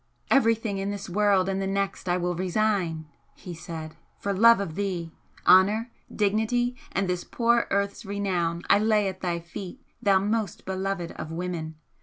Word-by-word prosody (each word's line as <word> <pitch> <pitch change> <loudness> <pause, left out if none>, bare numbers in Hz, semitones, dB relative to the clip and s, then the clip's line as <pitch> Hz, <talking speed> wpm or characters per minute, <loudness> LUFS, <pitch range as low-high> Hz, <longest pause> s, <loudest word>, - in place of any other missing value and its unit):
"Everything 225 -5 +3
in 195 +1 -2
this 200 -1 -5
world 195 0 +2
and 195 0 -1
the 195 - -1
next 195 -1 -2
I 175 - +2
will 180 0 -1
resign," 185 -3 0 0.3
he 180 - -9
said 160 -1 -7 0.2
"for 200 - -2
love 230 +3 +6
of 195 -6 -3
thee! 180 -3 -3 0.3
Honour, 210 +6 +5 0.2
dignity 220 +4 +1 0.2
and 195 0 0
this 180 -1 -1
poor 235 0 +1
earth's 200 +2 -1
renown 185 -4 -1
I - - +5
lay 215 -1 +2
at 190 -1 -5
thy 175 -2 -1
feet, 175 +6 -8 0.2
thou 195 -2 +4
most 210 +1 -1
beloved 190 -2 -3
of 155 +1 -7
women! 165 -2 -4
195 Hz, 165 wpm, -26 LUFS, 175-210 Hz, 0.3 s, love